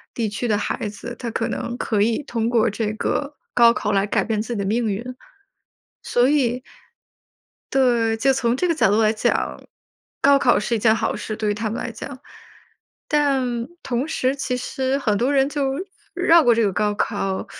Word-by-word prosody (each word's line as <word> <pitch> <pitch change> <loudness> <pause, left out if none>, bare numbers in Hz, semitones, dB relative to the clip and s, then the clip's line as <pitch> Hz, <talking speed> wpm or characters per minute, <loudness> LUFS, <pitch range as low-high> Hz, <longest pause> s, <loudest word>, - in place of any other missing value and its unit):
地 230 -2 -1
区 210 +4 -4
的 210 -2 +2
孩 205 +1 -3
子， 235 +3 -8
他 240 - -4
可 230 - -1
能 235 +1 -4
可 215 -4 0
以 225 +6 +1
通 230 -4 -2
过 235 -1 +3
这 215 0 -2
个 280 +6 -2 0.2
高 235 -1 +6
考 210 -3 -2
来 195 0 +2
改 - - +1
变 215 -1 -1
自 235 +2 -4
己 205 - -3
的 200 - -1
命 230 +4 0
运。 235 +5 -4 0.9
所 245 +1 +2
以 255 -4 +1 1.1
对， 235 -4 +2
就 270 +4 +3
从 245 -2 0
这 360 - 0
个 335 - +1
角 305 - +3
度 210 +2 +3
来 215 - +3
讲， 220 - -1 0.6
高 280 0 +6
考 255 -3 +3
是 230 +3 -1
一 - - 0
件 220 +1 +4
好 - - -1
事， 215 - -5
对 215 -2 -1
于 - - 0
他 215 +2 -3
们 220 - -4
来 - - -4
讲。 260 +3 -8 0.9
但， 265 -5 +1
同 250 +2 -2
时 260 -4 0
其 255 -2 -2
实 265 +2 -2
很 215 -7 0
多 255 +6 +1
人 270 -1 +3
就 285 -2 -1 0.4
绕 340 -1 +5
过 240 - +5
这 230 - +2
个 200 -3 +1
高 210 +2 0
考， 195 0 -2
235 Hz, 215 characters per minute, -22 LUFS, 215-265 Hz, 1.1 s, 高